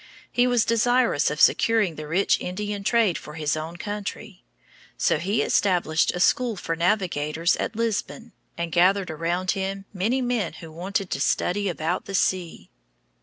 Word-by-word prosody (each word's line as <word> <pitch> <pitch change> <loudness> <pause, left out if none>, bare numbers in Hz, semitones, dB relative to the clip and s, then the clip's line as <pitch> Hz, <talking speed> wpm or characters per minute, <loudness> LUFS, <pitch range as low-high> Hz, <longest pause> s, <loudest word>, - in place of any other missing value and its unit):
He 245 +1 +3
was 245 -3 +2
desirous 235 - +2
of 150 +1 -4
securing 220 -6 +3
the 155 -1 -8
rich 180 +6 +2
Indian 205 +2 -4
trade 220 -4 +2
for 150 - -11
his 150 -2 -1
own 160 +2 -6
country. 205 0 -6 0.5
So - - +2
he 205 +4 0
established 175 -5 +2
a - - -3
school 240 +5 +2
for 165 -3 -3
navigators 170 -3 +1
at 215 - -3
Lisbon, 230 +1 -3 0.3
and 170 -1 -3
gathered 185 +1 +3
around 175 +4 -1
him 195 0 -3
many 215 +7 0
men 245 -7 -1
who 165 -2 -11
wanted 190 +3 -3
to 140 - -2
study 200 +6 0
about 170 +1 -2
the 195 - -5
sea. 175 - -1
190 Hz, 160 wpm, -24 LUFS, 165-215 Hz, 0.5 s, He